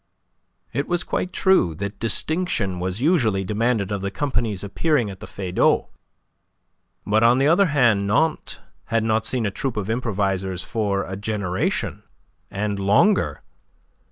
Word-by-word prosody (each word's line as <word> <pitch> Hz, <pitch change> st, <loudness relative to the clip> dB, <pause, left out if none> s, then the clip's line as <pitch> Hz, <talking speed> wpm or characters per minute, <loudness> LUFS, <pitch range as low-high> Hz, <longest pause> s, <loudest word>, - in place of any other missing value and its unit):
It 140 Hz, -, -1 dB
was 175 Hz, +1 st, 0 dB
quite 180 Hz, -, -2 dB
true 185 Hz, -, +3 dB
that 100 Hz, +4 st, -5 dB
distinction 115 Hz, -, -1 dB
was 95 Hz, +4 st, -3 dB
usually 120 Hz, -, +2 dB
demanded 105 Hz, 0 st, 0 dB
of 100 Hz, -1 st, -2 dB
the 100 Hz, -, -2 dB
companies 115 Hz, -5 st, -2 dB
appearing 120 Hz, +2 st, 0 dB
at 95 Hz, -, -11 dB
the -, -, -9 dB
Feydau, 95 Hz, -2 st, +1 dB, 1.2 s
but 110 Hz, +2 st, +2 dB
on 120 Hz, +2 st, +5 dB
the 135 Hz, -, +2 dB
other 180 Hz, +5 st, +4 dB
hand 120 Hz, -9 st, +3 dB
Nantes 155 Hz, +10 st, 0 dB, 0.2 s
had 115 Hz, -1 st, 0 dB
not 110 Hz, 0 st, +1 dB
seen 125 Hz, -3 st, 0 dB
a 100 Hz, -, -1 dB
troupe 125 Hz, +3 st, -3 dB
of 105 Hz, +1 st, -2 dB
improvisers 95 Hz, -5 st, -1 dB
for 100 Hz, -3 st, -1 dB
a 95 Hz, -, -6 dB
generation 100 Hz, -3 st, -2 dB, 0.5 s
and 100 Hz, 0 st, -2 dB
longer. 105 Hz, -, +2 dB
110 Hz, 145 wpm, -22 LUFS, 100-130 Hz, 1.2 s, on